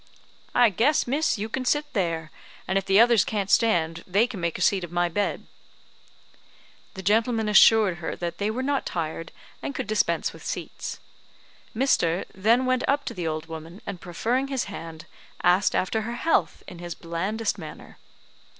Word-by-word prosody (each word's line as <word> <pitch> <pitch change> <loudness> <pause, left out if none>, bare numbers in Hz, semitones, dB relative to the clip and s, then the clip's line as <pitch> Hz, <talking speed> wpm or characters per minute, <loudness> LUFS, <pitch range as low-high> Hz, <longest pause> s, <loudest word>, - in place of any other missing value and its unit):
"I 240 -3 +6
guess, 265 - +2
miss, 285 +3 +1
you 210 +2 -3
can 255 +4 -3
sit 295 +3 0
there; 165 -5 -1 0.4
and 190 - -1
if 195 - -9
the 195 +1 +4
others 235 -3 +6
can't 200 -3 -2
stand, 170 -7 +2
they 200 +5 +3
can 240 -6 -7
make 170 -1 -1
a - - -7
seat 190 0 +3
of 170 - -7
my 175 0 +1
bed." 205 +4 -2 1.5
The 190 - -7
gentlemen 220 +2 +2
assured 210 -2 +6
her 165 - -4
that 170 -1 -5
they 205 +1 0
were 245 +4 -2
not 280 0 0
tired, 165 -1 -4 0.3
and 280 - -5
could - - -3
dispense 215 +1 0
with - - -13
seats. - - -5 0.8
Mr. 185 -9 +2
then 230 +7 +3
went 255 0 +1
up 280 0 +1
to - - -4
the 175 -3 -3
old 155 0 -3
woman, 165 +3 -9
and 185 -4 -6
proffering 240 +10 -1
his 270 -3 -1
hand, 165 -5 -8 0.4
asked 180 +3 +3
after 220 +4 0
her 235 +2 -4
health 325 +6 0
in 175 - -10
his 175 -1 -6
blandest 195 +6 -2
manner. 155 -3 -10
200 Hz, 180 wpm, -25 LUFS, 170-235 Hz, 1.5 s, I